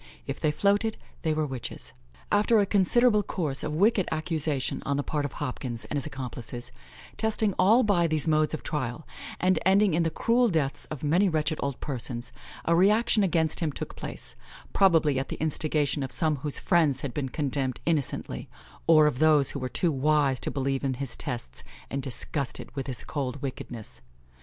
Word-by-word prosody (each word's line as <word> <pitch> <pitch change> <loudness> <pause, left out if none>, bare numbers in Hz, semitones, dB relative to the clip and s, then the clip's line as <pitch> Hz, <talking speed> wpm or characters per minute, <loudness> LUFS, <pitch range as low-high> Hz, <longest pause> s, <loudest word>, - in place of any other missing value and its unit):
If - - -4
they 155 - +2
floated, 205 +7 +1 0.2
they 160 - 0
were 155 0 0
witches. 120 - -6 0.4
After 210 +2 +4
a 200 - +4
considerable 210 +3 +4
course 155 -9 -3
of 150 - -3
wicked 200 +2 +3
accusation 155 -4 -1
on 140 0 -1
the 145 - 0
part 145 -1 -2
of 145 - -5
Hopkins 125 -2 -5
and - - -5
his 140 - -2
accomplices, 125 -3 -6 0.5
testing 220 -2 +1
all 220 +7 +6
by 180 -5 +3
these 155 -1 0
modes 155 0 +2
of - - -9
trial, 150 -1 -3 0.3
and 185 +1 +3
ending 195 0 +4
in 170 - +2
the 165 - +2
cruel 235 +8 +2
deaths 150 -7 -1
of 155 -2 -7
many 175 +7 +3
wretched 155 -1 0
old 140 -3 -2
persons, 125 -3 -3 0.3
a 170 - +3
reaction 210 +5 +4
against 165 -4 +1
him 160 -3 0
took - - -6
place, - - -7 0.4
probably 160 -8 +4
at 135 - -4
the - - -3
instigation 155 -1 0
of 130 - -4
some 155 -3 +1
whose 145 +1 -3
friends 155 -6 +2
had 135 -4 -4
been 140 -3 -2
condemned 135 -3 -2
innocently, 155 -6 -1 0.4
or 155 -2 +7
of 145 -4 +1
those 155 -3 +4
who 140 - -4
were 130 -1 -3
too 170 +4 +1
wise 140 -2 +2
to - - -1
believe 135 0 -1
in 135 -2 0
his 135 -1 -5
tests, 120 - -6 0.3
and 140 - -2
disgusted 135 +2 -4
with 135 -1 -4
his 125 -4 -3
cold 140 -2 -3
wickedness. 120 -4 -6
150 Hz, 185 wpm, -27 LUFS, 135-175 Hz, 0.5 s, or